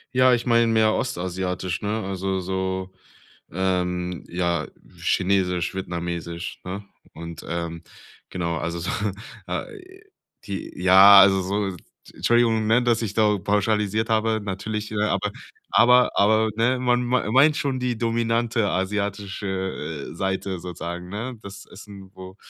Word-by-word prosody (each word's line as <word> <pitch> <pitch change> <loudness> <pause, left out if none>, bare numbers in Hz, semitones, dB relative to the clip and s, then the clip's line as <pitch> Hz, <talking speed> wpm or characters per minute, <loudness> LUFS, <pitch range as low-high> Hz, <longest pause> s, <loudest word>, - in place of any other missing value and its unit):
Ja, 130 0 +5
ich 120 - 0
meine 115 -1 +4
mehr 110 -1 +3
Ostasiatisch, 90 -3 -3
ne, 105 +2 -2
also 95 0 -2
so, 95 0 -3 0.6
ähm, 90 -1 -1
ja, 85 -3 -1 0.3
Chinesisch, 90 -2 0
Vietnamesisch, 85 -2 -5
ne? 95 +3 -6 0.3
Und, 85 0 -8
ähm, 85 -1 -4 0.5
genau, 85 -3 -2
also 85 +1 -3
so 85 +2 -3 0.6
äh, 380 -3 -7 0.4
die 100 -1 -6
ja, 95 +2 +9
also 95 -1 +5
so 100 0 -2 0.4
Entschuldigung, 115 -2 +2
ne, 120 +2 +3
dass 120 -1 +2
ich 105 -2 -4
da 105 -2 +3
pauschalisiert 105 +2 0
habe, 110 0 +1
natürlich, 105 +2 -4
äh, 105 -1 -1
aber 105 - 0 0.4
aber 125 +1 +5
aber, 110 +2 +3
ne, 125 +3 +2
man 125 -1 +1
mein 120 -3 0
meint 145 +3 +5
schon 135 -2 -1
die 125 -2 -1
dominante 115 -1 0
asiatische, 95 -5 -3
äh, - - -9
Seite 95 -1 -2
sozusagen, 90 0 -6
ne? 115 +4 -5
Das 100 0 -10
Essen, 100 -2 -13
wo 95 0 -11
100 Hz, 135 wpm, -23 LUFS, 90-115 Hz, 0.6 s, ja